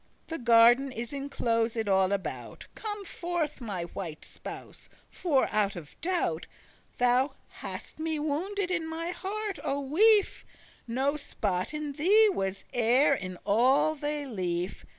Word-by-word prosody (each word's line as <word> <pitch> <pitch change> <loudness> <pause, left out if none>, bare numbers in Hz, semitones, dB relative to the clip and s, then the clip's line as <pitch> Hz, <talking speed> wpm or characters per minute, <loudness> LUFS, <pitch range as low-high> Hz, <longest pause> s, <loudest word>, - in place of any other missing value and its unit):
The 325 - -5
garden 240 +3 +6
is 235 +1 -6
enclosed 230 -5 -1
all 190 -1 +3
about; 200 -1 -4
Come 415 -2 -5
forth, 340 -6 -3
my 200 -7 -3
white 170 -2 -7
spouse; - - -10 0.2
for, 295 -7 +1
out 205 -2 +1
of 160 -4 -10
doubt, 330 - -1 0.5
Thou 250 +3 +3
hast - - -8
me 320 0 -1
wounded 355 +6 -2
in 330 -3 -1
mine 330 +2 -3
heart, 400 +1 -4
O 275 +1 -1
wife: 400 +10 +3 0.4
No 265 +5 +1
spot 195 -9 -2
in 300 -1 -4
thee 400 +10 +5
was 195 - -2
e'er 245 +5 +4
in 185 -7 -4
all 250 +9 +4
thy 295 0 -3
life. 180 -6 -3
275 Hz, 135 wpm, -29 LUFS, 215-325 Hz, 0.5 s, garden